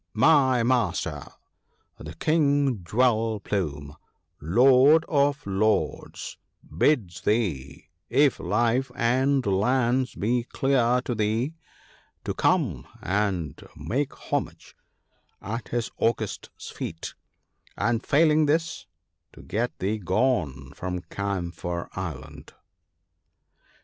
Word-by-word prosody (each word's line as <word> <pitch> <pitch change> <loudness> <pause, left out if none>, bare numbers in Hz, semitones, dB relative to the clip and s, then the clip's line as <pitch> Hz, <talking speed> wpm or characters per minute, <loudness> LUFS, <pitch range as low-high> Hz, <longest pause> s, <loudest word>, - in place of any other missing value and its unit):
— - - -53 0.2
My 130 -6 +4
master, 125 -2 0 0.8
the 75 +2 -9
King 140 - +1
Jewel 110 +2 +1
plume, 75 -8 -3 0.5
Lord 130 - +5
of 145 -1 +1
Lords, 100 +2 -1 0.4
bids 90 - +1
thee, 95 - -1 0.2
if 140 +3 +3
life 120 +7 +1
and 130 +3 +2
lands 125 +6 +1
be 120 +3 0
dear 125 -2 +3
to 120 - -1
thee, 110 +6 0 0.7
to - - -2
come 130 - +1 0.2
and 95 -6 -1
make 135 +4 -2 0.2
homage - - -3 0.6
at 115 +4 -5
his 120 -1 -2
august 115 -2 -1
feet; 80 0 -6 0.6
and 115 +2 0
failing 155 0 +4
this 160 -5 -1 0.5
to 60 - -14
get 115 - -2
thee 105 +3 -1
gone 90 - 0
from 90 -1 -4
Camphor 90 -3 -3
island." 85 -9 -7
115 Hz, 100 wpm, -26 LUFS, 95-130 Hz, 0.8 s, Lord